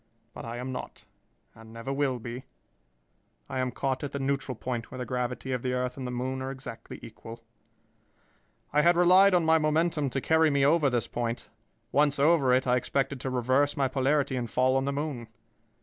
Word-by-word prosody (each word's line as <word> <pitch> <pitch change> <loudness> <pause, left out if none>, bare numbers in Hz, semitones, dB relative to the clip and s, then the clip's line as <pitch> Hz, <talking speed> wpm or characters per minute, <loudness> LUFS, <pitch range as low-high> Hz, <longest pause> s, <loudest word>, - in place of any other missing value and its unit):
But - - -8
I 115 +1 -5
am 125 +2 -5
not, 125 - -8 0.5
and 110 0 -14
never 115 +4 -5
will 135 -2 0
be. 120 +2 -7 1.0
I - - -4
am 130 0 0
caught 135 0 -2
at 145 - -5
the - - -2
neutral 135 -1 -2
point 120 0 -4
where 130 - -8
the 125 - -4
gravity 125 +1 -3
of 125 -2 -1
the 125 0 -2
earth 125 0 -2
and 130 -2 -5
the - - -4
moon 130 +2 -3
are 130 - -3
exactly 130 -4 -8
equal. 115 +1 -11 1.3
"I 150 - +5
had 170 +2 +4
relied 185 +2 +6
on 175 -2 +2
my 160 0 +5
momentum 155 -1 +1
to 135 - -2
carry 160 +3 +3
me 140 -1 +2
over 150 -1 +4
this 120 -3 0
point. 120 0 -4 0.4
Once 145 0 +3
over 140 -2 +4
it, 130 +1 +3
I 125 0 +3
expected 135 +2 -1
to 130 - -3
reverse 130 +4 +1
my 135 -1 +2
polarity 135 +1 +1
and 120 -2 -3
fall 130 +3 +2
on 135 0 +1
the 140 - 0
moon. 140 -5 -4
130 Hz, 200 wpm, -28 LUFS, 125-145 Hz, 1.3 s, relied